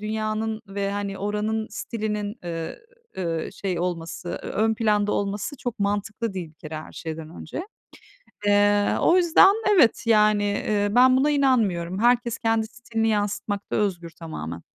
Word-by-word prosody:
dünyanın 215 +1 -2
ve, 200 0 -3
hani, 200 -1 -3
oranın 210 +2 -1
stilinin, 210 -1 -4
eee, 165 -1 -4 0.8
şey 185 -4 -3
olması, 175 -1 -4
eee, - - -6
ön 220 +1 +1
planda 210 -2 +1
olması 205 +8 -2
çok 245 -1 -5
mantıklı 205 +2 -1
değil, 175 -4 -4
bir - - -26
kere, 155 0 -8
her 155 - -8
şeyden 160 -1 -6
önce. 240 - -6 0.8
Eee, 205 0 +3
o 345 - +4
yüzden, 365 +2 +6 0.2
evet, 260 - +4
yani, 210 -2 +4
eee, 205 0 0
ben 255 +3 +6
buna 280 +3 +3
inanmıyorum. 210 -11 +1
Herkes 240 0 +2
kendi 225 -1 +1
stilini 225 -1 -2
yansıtmakta 205 -1 -1
özgür, 175 -5 -1
tamamen. 85 - -7
210 Hz, 140 wpm, -24 LUFS, 195-225 Hz, 0.8 s, yüzden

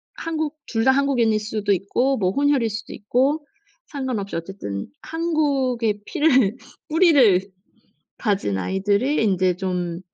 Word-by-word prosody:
한국 315 -2 -3
2 225 -2 -1
다 265 - +5
한국인일 250 -6 +2
수도 210 -1 -2
있고 245 +8 +1
뭐 185 -3 +1
혼혈일 280 -3 +2
수도 210 +1 -6
있고 270 +8 0 0.4
상관없이 255 - -4
어쨌든 165 - -5
한국의 275 -10 0
피를 265 - +2 0.3
뿌리를 290 - +5 0.8
가진 195 - 0
아이들이 200 - 0
인제 185 -3 +2
좀 180 -2 -3
225 Hz, 255 characters per minute, -22 LUFS, 195-280 Hz, 0.8 s, 다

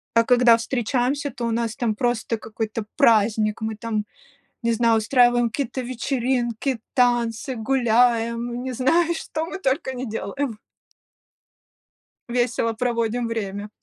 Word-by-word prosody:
А 230 - +6
когда 245 0 +5
встречаемся, 250 +4 -1
то 240 -2 -5
у 230 - -1
нас 225 -1 -1
там 235 -3 0
просто 230 0 -1
какой-то 220 0 -5
праздник, 220 -4 +3
мы 220 0 -2
там, 215 -1 -3 0.6
не 235 - +2
знаю, 230 0 +3
устраиваем 240 +1 +3
какие-то 260 +1 -3
вечеринки, 250 0 -1
танцы, 245 +1 +1
гуляем, 235 0 +1
не 260 - -3
знаю, 320 +8 +2
что 320 -1 -4
мы 345 - -6
только 265 -4 -1
не 255 0 -4
делаем. 225 +3 -3 1.7
Весело 240 -1 0
проводим 235 0 -1
время. 205 -2 -4
235 Hz, 125 wpm, -23 LUFS, 225-255 Hz, 1.7 s, А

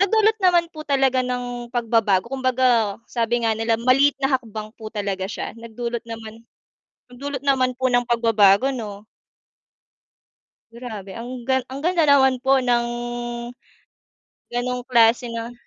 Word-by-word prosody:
nagdulot 435 +2 +3
naman 350 -2 +4
po 310 - -7
talaga 270 -3 +2
ng 245 -1 -4
pagbabago, 225 -5 +1
kumbaga 255 -5 +1
sabi 235 0 -1
nga 220 - +2
nila, 225 0 0
maliit 270 +4 +3
na 270 - +1
hakbang 220 -3 -5
po 220 -1 -9
talaga 200 -2 -3
siya - - -5
nagdulot 235 +1 -5
naman 225 0 -9 0.7
nagdulot 270 +2 -6
naman 260 -2 +3
po 260 - +1
ng 245 0 +3
pagbabago 225 -1 +4
'no. 210 -3 -7 1.7
Grabe, 220 -5 -8
ang 240 +1 -7 0.2
ang 270 +2 -7
ganda 345 -2 +2
naman 265 -2 +4
po 270 +1 +3
ng, 240 -2 +1 1.6
ganong 250 +1 -2
klase 235 0 +4
na. 230 +1 -5
240 Hz, 130 wpm, -22 LUFS, 225-260 Hz, 1.7 s, naman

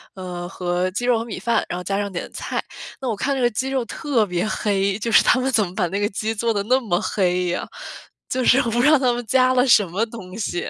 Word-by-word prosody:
嗯， 180 -2 -6
和 180 0 -2
鸡 245 +6 -3
肉 245 -2 +3
和 230 - -4
米 225 - -6
饭， 235 +4 +1
然 175 - -4
后 - - -7
加 195 +1 -1
上 200 -1 -3
点 175 - -5
菜。 - - -4 0.4
那 260 - -2
我 225 - -1
看 275 +7 -1
这 265 - -2
个 240 - +4
鸡 260 +4 -3
肉 265 -2 0
特 265 -1 0
别 180 +1 -2
黑， 200 -2 0
就 230 +2 -2
是 - - +6
他 255 - +4
们 265 +1 0
怎 220 -4 +3
么 175 - -9
把 185 -4 +1
那 195 +4 -3
个 205 - +1
鸡 220 +2 -3
做 230 +1 0
得 200 - 0
那 255 +5 +3
么 195 -9 -1
黑 180 -4 0
呀， 175 - -2 0.6
就 255 -1 -1
是 255 - +6
我 235 - 0
不 240 +2 +1
知 - - +5
道 305 - +5
他 255 -2 +2
们 240 0 -4
加 255 +2 +3
了 250 0 +4
什 210 -4 +6
么 200 +7 0
东 210 -5 -10
西。 175 -5 -3
215 Hz, 295 characters per minute, -22 LUFS, 185-245 Hz, 0.6 s, 是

